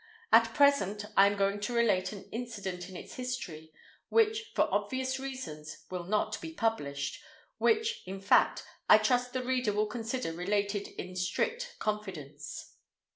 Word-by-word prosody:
At -, -, +6 dB
present 280 Hz, -9 st, +3 dB
I 195 Hz, -, +8 dB
am 200 Hz, 0 st, 0 dB
going 200 Hz, +1 st, +1 dB
to 210 Hz, +4 st, -3 dB
relate 210 Hz, -6 st, +2 dB
an 200 Hz, -2 st, -9 dB
incident 200 Hz, -6 st, -5 dB
in 185 Hz, -, -10 dB
its -, -, -10 dB
history 190 Hz, -12 st, -5 dB, 0.4 s
which, 445 Hz, 0 st, +2 dB
for -, -, +4 dB
obvious 260 Hz, 0 st, 0 dB
reasons, 210 Hz, -, -7 dB
will 180 Hz, -1 st, -4 dB
not 210 Hz, +3 st, 0 dB
be 325 Hz, -, -6 dB
published—which, 225 Hz, -, -1 dB
in 195 Hz, +1 st, -5 dB
fact, 195 Hz, +1 st, +4 dB, 0.3 s
I 215 Hz, -, +10 dB
trust 245 Hz, +3 st, +1 dB
the 255 Hz, -1 st, -1 dB
reader 250 Hz, -4 st, +1 dB
will 210 Hz, +1 st, +2 dB
consider 225 Hz, -2 st, -3 dB
related 200 Hz, +3 st, -1 dB
in 180 Hz, 0 st, -6 dB
strict 475 Hz, -, -1 dB
confidence. 175 Hz, -9 st, -5 dB
210 Hz, 145 wpm, -31 LUFS, 185-255 Hz, 0.4 s, I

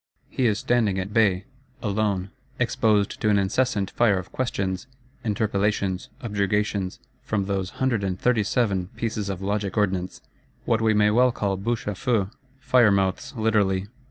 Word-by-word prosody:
He 130 Hz, -, +1 dB
is 105 Hz, -2 st, +1 dB
standing 110 Hz, -4 st, +1 dB
at 95 Hz, +2 st, -3 dB
bay: 100 Hz, -4 st, +3 dB, 0.4 s
alone; 100 Hz, -3 st, 0 dB, 0.3 s
exposed 105 Hz, -2 st, +1 dB
to 110 Hz, -, +2 dB
an 105 Hz, -, +4 dB
incessant 100 Hz, 0 st, 0 dB
fire 110 Hz, -5 st, +3 dB
of 90 Hz, -, -6 dB
questions, 100 Hz, -5 st, -2 dB, 0.4 s
interpellations, 100 Hz, -3 st, 0 dB
objurgations, 100 Hz, -3 st, -1 dB, 0.2 s
from 100 Hz, -3 st, -1 dB
those 95 Hz, -1 st, -2 dB
"hundred 125 Hz, -6 st, +1 dB
and 95 Hz, -1 st, -2 dB
thirty 125 Hz, -3 st, +2 dB
seven" 100 Hz, -4 st, 0 dB
pieces 110 Hz, -3 st, -2 dB
of 95 Hz, -1 st, -4 dB
logic 100 Hz, +1 st, -2 dB
ordnance,—what 95 Hz, +3 st, -2 dB
we 110 Hz, -1 st, +3 dB
may 105 Hz, 0 st, +4 dB
well 125 Hz, +3 st, +4 dB
call 100 Hz, -4 st, -1 dB
bouches 115 Hz, +5 st, -2 dB
à -, -, -12 dB
feu, 110 Hz, -3 st, 0 dB, 0.3 s
fire 125 Hz, -4 st, +4 dB
mouths 95 Hz, +5 st, 0 dB
literally! 100 Hz, -3 st, +1 dB
105 Hz, 150 wpm, -25 LUFS, 95-110 Hz, 0.4 s, an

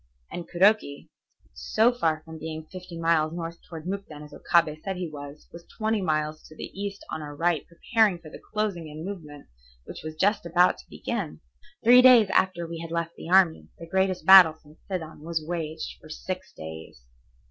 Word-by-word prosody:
And 175 Hz, -, -7 dB
Kuroki, 185 Hz, -5 st, +2 dB, 0.4 s
so 225 Hz, +3 st, +2 dB
far 160 Hz, -9 st, 0 dB
from 160 Hz, -1 st, -10 dB
being 160 Hz, 0 st, -6 dB
fifty 180 Hz, -2 st, -9 dB
miles 165 Hz, -1 st, +2 dB
north 170 Hz, 0 st, -6 dB
toward 160 Hz, -2 st, -8 dB
Mukden 185 Hz, -6 st, -6 dB
as 150 Hz, -, -13 dB
Okabe 155 Hz, -3 st, +1 dB
said 195 Hz, +1 st, -4 dB
he 180 Hz, -1 st, -4 dB
was, 145 Hz, -1 st, -10 dB
was 170 Hz, 0 st, -10 dB
twenty 220 Hz, -1 st, 0 dB
miles 155 Hz, -2 st, -1 dB
to 155 Hz, -, -15 dB
the -, -, -8 dB
east 200 Hz, 0 st, -6 dB
on 155 Hz, -, -4 dB
our 145 Hz, -1 st, -8 dB
right 165 Hz, 0 st, +1 dB
preparing 210 Hz, +3 st, +1 dB
for 160 Hz, -2 st, -13 dB
the -, -, -10 dB
closing 205 Hz, -6 st, -2 dB
in 155 Hz, +2 st, -8 dB
movement 155 Hz, -8 st, -8 dB, 0.4 s
which -, -, -9 dB
was 155 Hz, 0 st, -6 dB
just 205 Hz, +7 st, +1 dB
about 175 Hz, +1 st, +3 dB
to -, -, -16 dB
begin. 200 Hz, -10 st, -4 dB, 0.4 s
Three 245 Hz, +2 st, +8 dB
days 245 Hz, -5 st, +7 dB
after 185 Hz, -2 st, +1 dB
we 165 Hz, 0 st, -6 dB
had 165 Hz, 0 st, -7 dB
left 170 Hz, 0 st, -2 dB
the -, -, -9 dB
army, 180 Hz, -3 st, +4 dB
the 165 Hz, -, -9 dB
greatest 190 Hz, +1 st, 0 dB
battle 185 Hz, -4 st, +9 dB
since 150 Hz, +1 st, -19 dB
Sedan 165 Hz, -5 st, -5 dB
was 160 Hz, 0 st, -3 dB
waged 160 Hz, -2 st, -5 dB
for 155 Hz, -, -14 dB
six 185 Hz, +4 st, -6 dB
days. 80 Hz, -6 st, -10 dB
170 Hz, 190 wpm, -26 LUFS, 155-190 Hz, 0.4 s, battle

